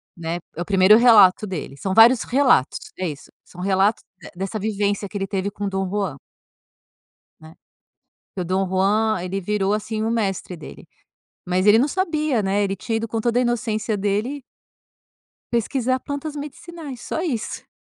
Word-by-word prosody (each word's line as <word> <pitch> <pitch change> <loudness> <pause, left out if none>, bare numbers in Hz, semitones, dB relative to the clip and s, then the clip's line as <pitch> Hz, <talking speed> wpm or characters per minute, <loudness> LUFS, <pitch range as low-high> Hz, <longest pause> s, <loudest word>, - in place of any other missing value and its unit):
Né, 170 0 -4 0.2
é 170 - -5
o - - -3
primeiro 195 +2 +6
relato 215 -5 +6
dele. 155 -7 -6
São 190 +4 -3
vários 230 +3 +7
relatos, 255 - +2 0.2
é 185 - -2
isso, 145 -1 -10
são 180 - -12
relatos 195 +3 +1 0.2
de - - -11
dessa 195 +4 -4
vivência 205 -1 -1
que 205 - -16
ele 195 0 -3
teve 200 0 -2
com 205 0 -5
o - - -1
Dom 190 0 -2
Juan. 195 -8 -2 1.2
Né, 160 0 -14 0.8
porque 185 - -4
o - - -3
Dom 190 +2 0
Juan, 200 +3 +1
ele 190 +2 -3
virou, 205 +1 0
assim, 215 +1 -2
o 225 - 0
mestre 195 -5 -2
dele. 155 - -12 0.6
Mas 185 +2 0
ele 210 +2 +7
não 275 +5 +2
sabia, 305 - 0
né, 195 +2 +1
ele 195 -1 -1
tinha 225 +4 -3
ido 225 0 -3
com 225 0 -2
toda 235 +1 +1
a - - +3
inocência 225 -3 -1
dele 210 +8 -2 1.1
pesquisar 255 +2 0
plantas 285 +2 -5
medicinais, 295 -1 -8
só 320 - -3
isso. 260 -11 -4
210 Hz, 175 wpm, -22 LUFS, 190-235 Hz, 1.2 s, vários